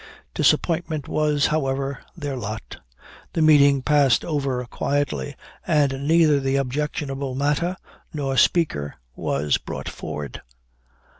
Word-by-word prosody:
Disappointment 160 -4 +1
was, 150 -2 +1
however, 135 -2 -1 0.2
their 145 -4 -4
lot. 110 -3 -6 0.6
The 160 - +2
meeting 140 -3 +5
passed 140 -5 +3
over 135 -5 -1
quietly, 130 - -2 0.3
and 140 -2 +1
neither 160 -3 +5
the 135 0 0
objectionable 140 0 -2
matter 150 +6 0 0.3
nor 140 -3 -2
speaker 125 - +2 0.2
was 70 +1 0
brought - - -6
forward. 75 -4 -6
140 Hz, 105 wpm, -23 LUFS, 135-150 Hz, 0.6 s, meeting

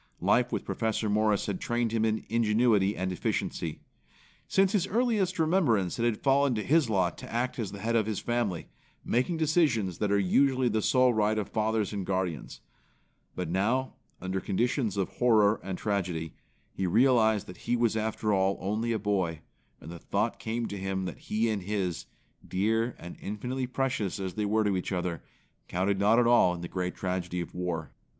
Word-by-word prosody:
Life - - +2
with - - -2
Professor 110 -1 -1
Morris 105 -1 +2
had 100 -3 -3
trained 120 -1 0
him 110 -1 +1
in 110 0 -1
ingenuity 110 -2 +2
and 95 0 -2
efficiency. 85 -2 -3 0.7
Since 195 -1 +3
his 195 -3 +1
earliest 215 -4 +1
remembrance 155 - +2
it 115 - +1
had 115 -3 -1
fallen 140 -1 +3
to 110 - -2
his 155 -4 +3
lot 95 -4 0
to - - -9
act 120 +2 -2
as 105 -5 -3
the 100 - -7
head 115 +1 0
of 110 -2 +2
his 110 -2 -2
family, 120 -8 -1 0.4
making 130 +8 0
decisions 145 - +1
that 105 - 0
usually 130 +7 +3
are - - +3
the 110 0 +1
sole 125 +2 +4
right 110 0 +1
of 105 - -2
fathers 110 -1 0
and 100 -2 -3
guardians. 90 -5 -3 0.7
But 90 - -3
now, 115 +8 0 0.3
under 95 +1 -2
conditions 115 0 0
of 95 - +1
horror 110 -4 +3
and 95 -1 -4
tragedy, 90 -7 -2 0.4
he 95 - -2
realized 110 0 +3
that 90 - -11
he 120 - +2
was 115 -2 +1
after 110 -1 -1
all 95 0 +2
only 110 +5 -1
a - - 0
boy; 95 -6 -1 0.4
and 80 - -10
the 85 - -8
thought 105 +7 -1
came 115 +1 -2
to 100 - -5
him 95 0 -2
that 90 - -6
he 110 +2 -1
and 105 -3 -1
his, 95 -3 -3 0.4
dear 110 +5 0
and 85 - -10
infinitely 125 +5 -3
precious 125 -7 -2
as 95 -2 -4
they 105 +3 -2
were 110 +2 +2
to 100 -2 +1
each 90 - -3
other, 90 -2 -2 0.5
counted 95 +2 0
not 105 +3 +4
at 120 - +4
all 115 -7 +5
in 85 - -8
the 85 - -5
great 90 0 -3
tragedy 90 -1 -3
of 85 - -5
war. 85 -5 -3
105 Hz, 190 wpm, -29 LUFS, 95-120 Hz, 0.7 s, all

